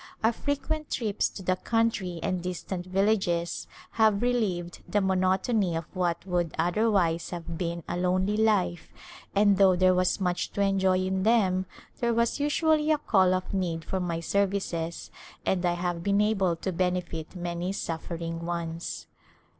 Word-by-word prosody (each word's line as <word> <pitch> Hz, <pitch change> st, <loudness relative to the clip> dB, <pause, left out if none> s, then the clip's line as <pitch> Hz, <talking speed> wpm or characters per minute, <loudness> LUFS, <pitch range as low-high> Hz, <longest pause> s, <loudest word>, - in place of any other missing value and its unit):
Our 225 Hz, -, +5 dB
frequent 285 Hz, +4 st, -3 dB
trips 215 Hz, -4 st, 0 dB
to 195 Hz, -, -9 dB
the 185 Hz, 0 st, +2 dB
country 215 Hz, -6 st, 0 dB
and 185 Hz, -1 st, -1 dB
distant 180 Hz, 0 st, -5 dB
villages 185 Hz, -3 st, 0 dB, 0.2 s
have 220 Hz, -1 st, +3 dB
relieved 195 Hz, -9 st, -1 dB
the 205 Hz, -, +2 dB
monotony 190 Hz, 0 st, +1 dB
of 165 Hz, 0 st, -3 dB
what 175 Hz, -1 st, -1 dB
would 175 Hz, -3 st, -1 dB
otherwise 175 Hz, -1 st, +1 dB
have 170 Hz, -1 st, -6 dB
been 170 Hz, 0 st, -3 dB
a -, -, -2 dB
lonely 185 Hz, +3 st, +1 dB
life 205 Hz, -6 st, +1 dB, 0.4 s
and 200 Hz, -1 st, +5 dB
though 190 Hz, -2 st, +6 dB
there 185 Hz, +1 st, +4 dB
was 185 Hz, +2 st, +1 dB
much 180 Hz, -2 st, -1 dB
to 200 Hz, -, -1 dB
enjoy 190 Hz, -1 st, +3 dB
in 190 Hz, 0 st, -1 dB
them 190 Hz, -4 st, +2 dB, 0.3 s
there 235 Hz, -1 st, +1 dB
was 235 Hz, +3 st, +1 dB
usually 305 Hz, +1 st, +2 dB
a 305 Hz, -, +4 dB
call 190 Hz, -9 st, +3 dB
of 185 Hz, +1 st, -4 dB
need 170 Hz, -4 st, -2 dB
for 190 Hz, -, -2 dB
my 170 Hz, -2 st, -2 dB
services 185 Hz, -3 st, -1 dB, 0.3 s
and 185 Hz, -1 st, +1 dB
I 175 Hz, -, +2 dB
have 175 Hz, -1 st, -2 dB
been 200 Hz, +3 st, +2 dB
able 200 Hz, -5 st, +2 dB
to 190 Hz, +3 st, -3 dB
benefit 180 Hz, -2 st, -2 dB
many 175 Hz, +1 st, -3 dB
suffer 170 Hz, -3 st, -4 dB
ing 165 Hz, 0 st, -5 dB
ones. 170 Hz, -1 st, -4 dB
185 Hz, 160 wpm, -27 LUFS, 175-205 Hz, 0.4 s, though